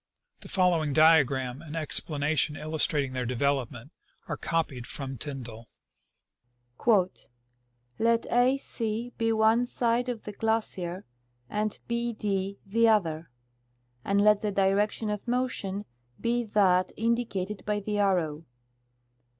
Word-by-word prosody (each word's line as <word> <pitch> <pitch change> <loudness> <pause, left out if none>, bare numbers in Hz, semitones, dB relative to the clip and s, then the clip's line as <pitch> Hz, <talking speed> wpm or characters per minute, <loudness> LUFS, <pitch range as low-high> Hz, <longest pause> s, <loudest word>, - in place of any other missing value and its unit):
The - - -10
following 170 -6 +2
diagram 135 -4 +4
and 160 -2 -8
explanation 150 -1 +1
illustrating 150 -3 0
their 125 -1 -2
development 125 0 -1 0.4
are - - -2
copied 145 -7 -2
from 135 -1 -5
Tyndall: 120 -4 -7 1.2
" 120 - -2
Let 230 0 +2
A 250 +3 +4
C 230 -2 -4
be 225 0 +2
one 225 +2 +3
side 245 0 0
of 235 -3 -4
the 210 - -6
glacier 205 -4 -2 0.5
and 210 0 -1
B 235 0 -1
D 200 -2 -2
the 230 +4 +3
other; 170 -7 +1 0.7
and 200 0 +1
let 210 -1 +5
the 210 - -1
direc 195 +2 +2
tion 215 -1 -4
of 210 +3 -5
motion 235 -5 -2 0.3
be 240 +1 0
that 185 -4 +3
indicated 220 -4 -1
by 210 0 +1
the 205 +1 -2
arrow. 165 -6 +1
195 Hz, 125 wpm, -28 LUFS, 150-220 Hz, 1.2 s, let